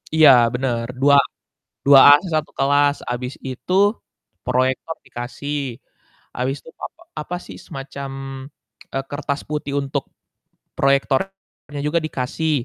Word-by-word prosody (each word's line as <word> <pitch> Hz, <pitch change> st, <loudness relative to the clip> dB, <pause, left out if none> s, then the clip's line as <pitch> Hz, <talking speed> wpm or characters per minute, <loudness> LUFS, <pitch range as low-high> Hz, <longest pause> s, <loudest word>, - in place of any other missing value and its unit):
Iya 155 Hz, -2 st, +8 dB, 0.2 s
bener 125 Hz, -2 st, -1 dB, 0.2 s
dua 140 Hz, +1 st, +6 dB, 0.7 s
duaan 145 Hz, +1 st, +9 dB
sa -, -, -5 dB
satu 155 Hz, -, -10 dB
kelas, 145 Hz, +1 st, +3 dB
habis 125 Hz, +2 st, -3 dB
itu 130 Hz, +7 st, -5 dB, 0.7 s
proyektor 130 Hz, +5 st, 0 dB
dikasih. 135 Hz, +4 st, -5 dB, 0.8 s
Habis 130 Hz, +3 st, -1 dB
itu -, -, -14 dB
papa -, -, -8 dB, 0.2 s
apa 175 Hz, +4 st, -5 dB
sih -, -, -10 dB
semacam, 135 Hz, 0 st, -7 dB, 0.8 s
eee, 135 Hz, -, -1 dB
kertas 145 Hz, 0 st, -3 dB
putih 150 Hz, -2 st, -3 dB
untuk 135 Hz, -1 st, -2 dB, 0.8 s
proyektornya 140 Hz, +3 st, -1 dB
juga 160 Hz, +3 st, +2 dB
dikasih 155 Hz, +3 st, -2 dB
140 Hz, 115 wpm, -21 LUFS, 130-150 Hz, 0.8 s, duaan